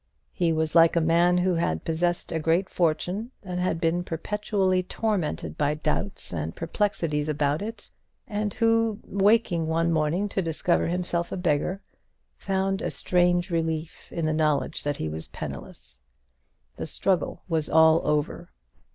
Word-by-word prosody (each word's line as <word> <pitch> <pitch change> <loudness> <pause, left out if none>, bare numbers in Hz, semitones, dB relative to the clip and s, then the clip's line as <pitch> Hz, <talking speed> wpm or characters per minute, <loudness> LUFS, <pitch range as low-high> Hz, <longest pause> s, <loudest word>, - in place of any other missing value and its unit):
He 170 -2 +1
was 160 -1 0
like 165 0 +6
a - - +4
man 170 +2 +3
who 180 +1 +2
had 125 - -1
possessed 175 +2 -1
a 165 - -1
great 165 +4 +1
fortune, 180 +6 0
and 180 -2 -4
had 180 -2 0
been 170 +1 +1
perpetually 190 +2 0
tormented 180 - -2
by 145 +1 +2
doubts 155 - -3
and 80 0 -3
perplexities 165 -4 -1
about 150 +1 0
it, 215 0 -7 0.4
and 210 0 -2
who, 225 -2 +2
waking 200 -4 +2
one 165 +1 +1
morning 165 +5 +1
to 195 - -1
discover 170 +1 0
himself 175 0 -1
a - - -3
beggar, 180 +3 0 0.5
found 195 0 -1
a - - -1
strange 175 0 +2
relief 160 -1 -3
in 165 - -2
the 155 - +1
knowledge 150 -4 0
that 145 -1 -1
he 80 - -3
was 80 +1 -6
penniless. - - -8 0.8
The - - -4
struggle 190 -3 0
was 160 -4 0
all 160 0 +6
over. 150 -1 -1
170 Hz, 150 wpm, -26 LUFS, 155-190 Hz, 0.8 s, like